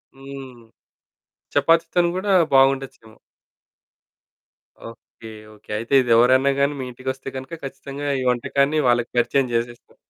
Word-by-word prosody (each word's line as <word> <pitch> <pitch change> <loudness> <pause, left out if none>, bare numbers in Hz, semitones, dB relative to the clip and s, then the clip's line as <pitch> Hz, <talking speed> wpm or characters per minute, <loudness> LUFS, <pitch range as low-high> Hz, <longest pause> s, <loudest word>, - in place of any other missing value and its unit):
హ్మ్. 135 -2 -11 0.9
చపాతీతోని 165 +4 +2
గూడా 195 +2 -2 0.2
బాగుండొచ్చేమో! 135 -4 +1 1.7
Okay. 115 0 -15 0.2
Okay. 105 - -23
అయితే 115 +5 -5
ఇదెవరన్నా 125 +3 +4
గాని 140 +1 +1
మీ - - -4
ఇంటికొస్తే 130 +2 -6
గనక 135 +5 -8
ఖచ్చితంగా 140 +1 -7
ఈ - - -3
వంటకాన్ని 140 +5 0
వాళ్ళకి 120 -1 +1
పరిచయం 130 +2 +1
జేసేస్తారు. 120 +1 -4
135 Hz, 105 wpm, -21 LUFS, 120-140 Hz, 1.7 s, ఇదెవరన్నా